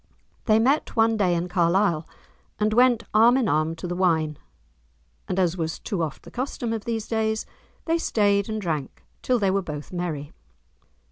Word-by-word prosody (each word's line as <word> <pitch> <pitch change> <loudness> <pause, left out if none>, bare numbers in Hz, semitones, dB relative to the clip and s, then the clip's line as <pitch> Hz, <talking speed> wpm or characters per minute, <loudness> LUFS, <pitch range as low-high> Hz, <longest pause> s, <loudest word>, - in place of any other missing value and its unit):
They 215 -1 +4
met 265 +7 +1
one 225 -1 +3
day 185 -5 +2
in 170 +1 -1
Carlisle, 175 -1 +1 0.5
and 215 0 +1
went 245 0 +4
arm 230 +4 +6
in 255 -5 +1
arm 155 +2 +1
to 170 +2 -6
the 175 - -3
wine, 160 -5 +1 0.9
and, 185 - -2
as 180 -1 +1
was 160 -1 -2
too 195 -6 -3
oft 155 -3 -4
the - - -13
custom 245 -2 -3
of 220 -2 -4
these 225 -2 -3
days, 220 -1 -1 0.4
they 330 0 +1
stayed 200 -6 +1
and 215 0 -2
drank 155 -8 -4 0.2
till 255 - +1
they 200 -4 +1
were 195 +1 +1
both 150 -2 -7
merry. 160 -5 -4
195 Hz, 180 wpm, -24 LUFS, 170-225 Hz, 0.9 s, arm